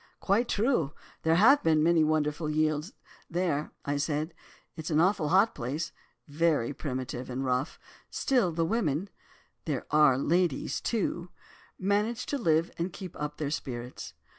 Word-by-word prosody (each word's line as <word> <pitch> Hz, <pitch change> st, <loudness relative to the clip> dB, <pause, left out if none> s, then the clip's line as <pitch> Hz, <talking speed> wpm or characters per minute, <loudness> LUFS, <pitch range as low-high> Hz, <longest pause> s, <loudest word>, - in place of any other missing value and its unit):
"'Quite 220 Hz, +5 st, +1 dB
true. 205 Hz, -, +1 dB, 0.3 s
There 160 Hz, 0 st, +3 dB
have 250 Hz, +11 st, +6 dB
been 155 Hz, -1 st, +3 dB, 0.2 s
wonderful 155 Hz, 0 st, 0 dB
yields 155 Hz, -, 0 dB, 0.4 s
there,' 165 Hz, -4 st, -1 dB, 0.3 s
said 150 Hz, +2 st, -1 dB
I; -, -, -28 dB, 0.3 s
'it's 160 Hz, -1 st, -5 dB
an 155 Hz, -1 st, +2 dB
awful 175 Hz, -3 st, +2 dB
hot 195 Hz, +5 st, +4 dB
place, 135 Hz, +7 st, -3 dB, 0.4 s
very 150 Hz, -4 st, +1 dB
primitive 130 Hz, -3 st, -5 dB
and 130 Hz, +2 st, -3 dB
rough. 130 Hz, +2 st, -1 dB, 0.3 s
Still, 245 Hz, -10 st, +1 dB
the 165 Hz, 0 st, 0 dB
women—there 165 Hz, -, -4 dB
are 150 Hz, -4 st, +5 dB
ladies, 170 Hz, +1 st, 0 dB
too—manage 205 Hz, +2 st, -2 dB
to 285 Hz, -, -2 dB
live 165 Hz, -5 st, +2 dB
and 175 Hz, +2 st, -1 dB
keep 185 Hz, -1 st, -8 dB
up 150 Hz, 0 st, -4 dB
their 145 Hz, -2 st, -2 dB
spirits. 125 Hz, -4 st, -5 dB
160 Hz, 135 wpm, -29 LUFS, 145-185 Hz, 0.4 s, have